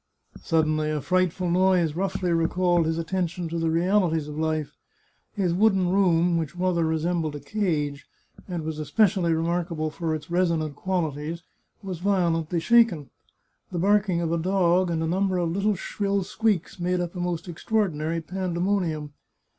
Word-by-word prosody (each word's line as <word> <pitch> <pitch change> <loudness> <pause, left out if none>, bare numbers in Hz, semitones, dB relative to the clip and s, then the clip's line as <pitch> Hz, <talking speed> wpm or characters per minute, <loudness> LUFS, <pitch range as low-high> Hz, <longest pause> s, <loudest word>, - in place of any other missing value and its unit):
Suddenly 155 -1 +1
a 155 -1 -1
frightful 185 +3 0
noise 180 -3 +3
roughly 190 -1 -1
recalled 170 0 +2
his 160 0 -1
attention 175 0 -2
to 170 +1 -3
the 165 0 0
realities 165 -2 +1
of 150 - -7
life. 155 -2 -1 0.6
His 185 -4 0
wooden 190 -2 +3
room, 175 -3 +3
which 160 0 -4
rather 180 -2 +1
re 160 0 +1
sembled 160 -2 -1
a - - -5
cage, 150 -8 -2 0.4
and 175 -4 -4
was 155 0 -4
especially 175 +3 +2
remarkable 165 -1 -1
for 160 0 -2
its 155 +2 -8
resonant 165 -4 0
qualities, 165 -2 -3 0.4
was 185 -4 -5
violently 170 -3 +1
shaken; 225 - +3 0.6
the 180 - -3
barking 195 -1 +2
of 165 -1 -1
a 170 - +1
dog 185 0 +2
and 165 -1 -1
a - - -1
number 190 +2 +1
of 170 -2 0
little 200 +3 +1
shrill 200 +1 -1
squeaks 200 -2 -1
made 180 +1 0
up 175 -1 -3
a - - -5
most 175 -1 -3
extraordinary 170 -3 -1
pandemonium. 175 -3 -2
175 Hz, 155 wpm, -25 LUFS, 160-185 Hz, 0.6 s, noise